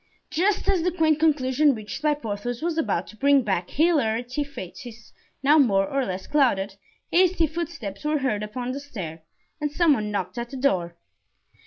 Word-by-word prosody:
Just 390 Hz, +5 st, +1 dB
as 390 Hz, -3 st, +2 dB
the 360 Hz, +2 st, +1 dB
quaint 315 Hz, -3 st, +2 dB
conclusion 290 Hz, -2 st, +3 dB
reached 210 Hz, +2 st, -7 dB
by 300 Hz, -1 st, +2 dB
Porthos 235 Hz, 0 st, -4 dB
was 340 Hz, -1 st, 0 dB
about 205 Hz, -, 0 dB
to -, -, -13 dB
bring 280 Hz, +3 st, +4 dB
back 190 Hz, -5 st, -1 dB
hilarity 265 Hz, -5 st, +1 dB
to 285 Hz, -, -14 dB
faces 235 Hz, +1 st, -10 dB, 0.3 s
now 295 Hz, +3 st, +6 dB
more 195 Hz, -8 st, +3 dB
or 275 Hz, -1 st, 0 dB
less 185 Hz, 0 st, -4 dB
clouded, 210 Hz, -9 st, +2 dB, 0.4 s
hasty 360 Hz, -1 st, +4 dB
footsteps 305 Hz, -, -5 dB
were 300 Hz, 0 st, +1 dB
heard 260 Hz, -7 st, -1 dB
upon 245 Hz, +4 st, -4 dB
the 270 Hz, -, -4 dB
stair 185 Hz, -, -7 dB, 0.4 s
and 295 Hz, -1 st, -2 dB
some 325 Hz, 0 st, +4 dB
one 215 Hz, -5 st, -1 dB
knocked 195 Hz, 0 st, -3 dB
at 235 Hz, 0 st, -5 dB
the 270 Hz, -, -7 dB
door. 180 Hz, -11 st, 0 dB
260 Hz, 180 wpm, -25 LUFS, 210-305 Hz, 0.4 s, now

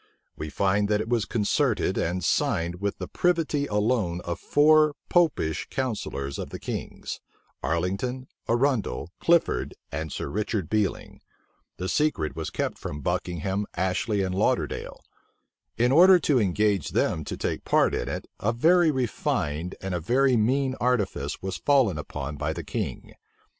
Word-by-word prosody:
We 75 Hz, -, -5 dB
find 100 Hz, +4 st, +1 dB
that 105 Hz, -1 st, +2 dB
it 110 Hz, -, -3 dB
was 115 Hz, -4 st, +1 dB
concerted 105 Hz, -4 st, +1 dB
and 90 Hz, +2 st, -1 dB
signed 85 Hz, +4 st, 0 dB
with 100 Hz, 0 st, -1 dB
the -, -, -5 dB
privity 165 Hz, -5 st, +1 dB
alone 105 Hz, -4 st, 0 dB
of 85 Hz, -1 st, -4 dB
four 155 Hz, 0 st, +4 dB
Popish 155 Hz, -, +2 dB
counsellors 105 Hz, -, -3 dB
of -, -, -5 dB
the -, -, -6 dB
king's; -, -, -5 dB, 0.4 s
Arlington, 95 Hz, +10 st, -1 dB, 0.2 s
Arundel, 120 Hz, -, 0 dB
Clifford, 170 Hz, -1 st, +2 dB, 0.2 s
and 80 Hz, +1 st, -4 dB
Sir -, -, -4 dB
Richard 105 Hz, -3 st, -2 dB
Bealing. 105 Hz, -2 st, -1 dB, 0.6 s
The 90 Hz, -, -3 dB
secret 85 Hz, -, 0 dB
was 80 Hz, -1 st, -4 dB
kept -, -, -3 dB
from 75 Hz, -, -6 dB
Buckingham, 90 Hz, +4 st, -2 dB
Ashley, 95 Hz, +3 st, 0 dB
and 95 Hz, -1 st, -2 dB
Lauderdale. 95 Hz, -, -1 dB, 0.8 s
In 120 Hz, +2 st, +3 dB
order 180 Hz, +6 st, +8 dB
to 150 Hz, -6 st, +2 dB
engage 100 Hz, -3 st, +1 dB
them 80 Hz, -, +1 dB
to -, -, -5 dB
take -, -, -2 dB
part -, -, +3 dB
in -, -, -2 dB
it, -, -, -4 dB
a 110 Hz, -, +1 dB
very 165 Hz, +8 st, +4 dB
refined 90 Hz, -, -1 dB
and 95 Hz, -1 st, -3 dB
a 90 Hz, -, 0 dB
very 130 Hz, +9 st, +3 dB
mean 130 Hz, +4 st, +2 dB
artifice 100 Hz, -, -1 dB
was 95 Hz, -2 st, -3 dB
fallen 120 Hz, -, +3 dB
upon 75 Hz, -1 st, -5 dB
by 75 Hz, +2 st, -1 dB
the -, -, -6 dB
king. -, -, -4 dB
105 Hz, 150 wpm, -26 LUFS, 85-130 Hz, 0.8 s, order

